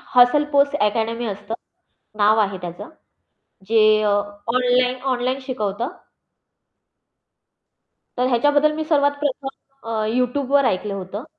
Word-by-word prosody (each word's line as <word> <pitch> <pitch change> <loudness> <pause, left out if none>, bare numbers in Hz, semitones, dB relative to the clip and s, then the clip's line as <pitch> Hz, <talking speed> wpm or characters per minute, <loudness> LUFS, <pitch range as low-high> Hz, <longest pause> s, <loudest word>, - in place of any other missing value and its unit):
Hustle 245 +4 +6
post 280 0 +3
academy 225 +3 0
असतं 205 +1 -5 0.6
नाव 215 +1 +4
आहे 200 -2 0
त्याचं, 175 - -8 0.8
जे 225 -1 +3 0.2
अ, 210 - +2 0.4
ऑनलाईन 250 0 +2
ऑनलाईन 255 +2 -2
शिकवतं. 230 -3 -3 2.3
तर 250 0 +1
ह्याच्याबद्दल 290 +5 +3
मी 315 - -2
सर्वात 285 -2 +2
प्रथम 280 -1 -2 0.4
अ, 220 -1 -1
Youtubeवर 255 +4 +1
ऐकलं 200 +2 -2
होतं. 195 +5 -6
245 Hz, 110 wpm, -21 LUFS, 215-275 Hz, 2.3 s, Hustle